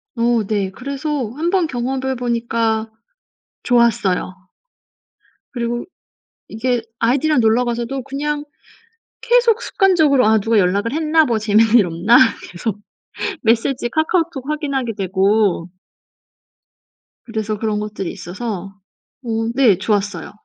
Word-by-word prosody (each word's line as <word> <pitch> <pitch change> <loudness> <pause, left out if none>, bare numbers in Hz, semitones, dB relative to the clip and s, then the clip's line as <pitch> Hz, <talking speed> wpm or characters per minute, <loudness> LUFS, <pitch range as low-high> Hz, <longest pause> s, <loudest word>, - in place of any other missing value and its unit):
어 235 -1 +1
네. 200 -3 -1
그래서 275 +1 -4
한번 345 +2 +1
경험을 260 0 -3
해 - - -2
보니까 230 -2 -1 0.7
좋았어요. 225 -7 +2 1.2
그리고 240 -1 -3 0.6
이게 240 +2 -1 0.2
아이들이랑 275 +5 +2
놀러 225 +1 +3
가서도 240 +2 -3
그냥 290 +2 -3 0.8
계속 475 -1 +3
습관적으로 320 - +3
'아 220 0 +4
누가 225 +2 +1
연락을 200 +6 +1
했나 315 0 +3
뭐 235 -4 0
재밌는 215 +1 +3
일 205 - +4
없나?' 175 +9 +3 0.3
계속 200 +4 -4 0.6
메시지 240 +2 +1
카카오톡 315 -1 -1
확인하게 275 -6 -2
되고. 195 -1 +1 1.6
그래서 220 -2 -3
그런 215 -1 -1
것들이 210 -3 -4
있어서 195 +1 -6 0.5
어 225 -1 -2
네 240 -9 +4
좋았어요. 205 0 -2
235 Hz, 260 characters per minute, -19 LUFS, 215-275 Hz, 1.6 s, 아